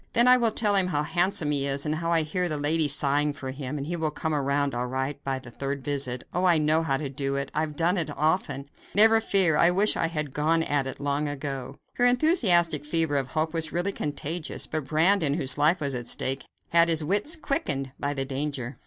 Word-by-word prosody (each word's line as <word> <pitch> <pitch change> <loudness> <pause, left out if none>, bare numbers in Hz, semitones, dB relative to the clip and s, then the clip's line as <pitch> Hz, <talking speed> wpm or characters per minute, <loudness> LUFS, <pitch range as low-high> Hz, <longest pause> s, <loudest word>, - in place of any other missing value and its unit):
"Then 235 +1 +4
I 250 - +8
will 235 -2 +2
tell 210 -1 0
him 190 -2 +3
how 150 -5 -1
handsome 175 -2 0
he 140 -1 +1
is, 140 +1 0
and 150 - -1
how 165 +2 -2
I 165 -1 +3
hear 175 +3 -2
the 155 - -2
ladies 145 0 +3
sighing 145 +1 +1
for 130 -2 -7
him, 135 +1 -6
and 140 - -4
he 175 +3 -3
will 160 -2 -1
come 160 +1 -3
around 140 -1 0
all 120 +1 -2
right 135 +3 -4
by 135 -1 -2
the 130 -2 -11
third 140 +2 -5
visit. 135 -3 -2
Oh, 180 - -1
I 175 -3 +4
know 155 +1 +2
how 140 -4 0
to 145 - -4
do 135 0 -3
it; 140 0 -3
I 155 - 0
have 155 -1 -4
done 175 +4 +1
it 165 - 0
so 145 - -7
often. 150 -3 -1 0.3
Never 225 +2 +6
fear! 190 -8 +3
I 170 - +5
wish 195 +4 +2
I 165 - 0
had 150 -4 -4
gone 160 +2 +1
at 145 -3 -1
it - - -7
long 145 +1 -1
ago." 140 -2 -5 0.2
Her 245 - +3
enthusiastic 195 - +3
fever 160 -1 0
of 135 -2 -2
hope 155 +1 -1
was 160 -1 0
really 175 +3 -1
contagious, 155 0 -3
but 155 -3 -4
Brandon, 160 0 +2
whose 140 -4 -1
life 160 +5 +3
was 140 -3 -2
at 120 -1 -5
stake, 135 +3 -2 0.2
had 170 0 +4
his 160 -1 +2
wits 205 - +1
quickened 140 - -2
by 145 0 -2
the 135 -1 -2
danger. 135 -2 -4
150 Hz, 240 wpm, -26 LUFS, 140-170 Hz, 0.3 s, I